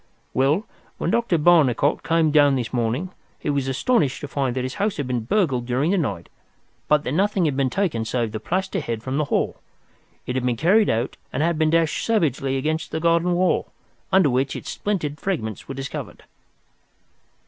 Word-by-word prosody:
Well, 145 - +2 0.3
when - - -1
Dr. 230 -7 +2
Barnicot 150 -4 +3
came 165 -2 +2
down 145 -2 +5
this 125 -2 -3
morning 125 +9 -1 0.3
he 150 - -2
was 140 -2 -1
astonished 140 - +1
to 145 - -5
find 135 -2 -1
that 130 - -1
his 130 +1 -3
house 210 0 0
had 145 - -2
been 125 -3 -2
burgled 130 - +1
during 130 +7 +1
the 200 - +2
night, 100 - -3 0.6
but 150 -1 +3
that - - -3
nothing 190 +2 +1
had 145 -4 0
been 135 -1 +1
taken 165 - -1
save 115 -1 -1
the 110 - -4
plaster 190 - -2
head 115 -1 -4
from 130 +2 -2
the 150 - +1
hall. - - -1 0.7
It 125 - -3
had 130 - -1
been 125 -2 0
carried 200 - +4
out 115 +3 -1
and 140 - -1
had 170 -1 0
been 155 -1 +3
dashed 165 -1 +1
savagely 140 - +1
against 155 +3 -2
the 160 - -3
garden 170 +2 +2
wall, 180 +1 +1 0.4
under 190 -7 +4
which 130 +2 0
its - - -6
splintered 155 -8 -2
fragments 110 - -3
were 135 - -6
discovered." 135 +1 -6
145 Hz, 190 wpm, -23 LUFS, 130-170 Hz, 0.7 s, down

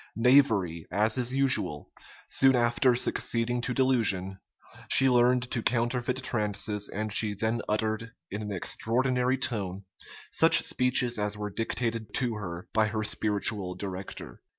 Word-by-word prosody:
Knavery, 110 - +2
as 110 +2 0
is 125 0 0
usual, 130 - +1 0.4
soon 135 -1 +3
after 120 +1 +2
succeeding 120 0 -1
to 125 - -3
delusion, 110 -8 +1 0.5
she 135 - +5
learned 125 0 +3
to 115 - -1
counterfeit 120 +2 -1
trances 105 -3 -2
and 110 +1 -5
she 105 -1 +1
then 110 +3 -2
uttered, 110 +1 -2 0.2
in 105 +2 -5
an 105 -1 -6
extraordinary 125 +6 0
tone, 100 -7 -3 0.5
such - - +7
speeches 125 -2 +1
as 105 0 -2
were 105 0 -5
dictated 115 +1 -4
to 125 -3 0
her 90 0 -7
by 110 -1 +2
her 110 0 -3
spiritual 105 -3 0
director. 95 -9 -8
115 Hz, 135 wpm, -27 LUFS, 105-125 Hz, 0.5 s, such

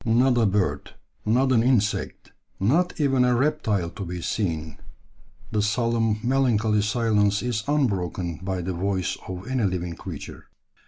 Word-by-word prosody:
"Not 120 +3 +3
a 115 -3 +3
bird, 100 -1 -1 0.3
not 130 +4 +3
an 120 -3 +4
insect, 115 -4 0 0.3
not 165 - +1
even 135 -4 +3
a 125 0 +3
reptile 110 - 0
to 100 - -7
be 90 0 -5
seen, 80 -5 -2 0.7
the 105 - +1
solemn, 115 0 +1
melancholy 115 -5 +2
silence 105 -1 +1
is 120 -3 -1
unbroken 95 - -1
by 95 -1 -2
the 95 +2 -2
voice 95 0 -1
of 95 +2 -6
any 130 -4 0
living 90 -2 -2
creature." - - -9
105 Hz, 145 wpm, -25 LUFS, 95-125 Hz, 0.7 s, an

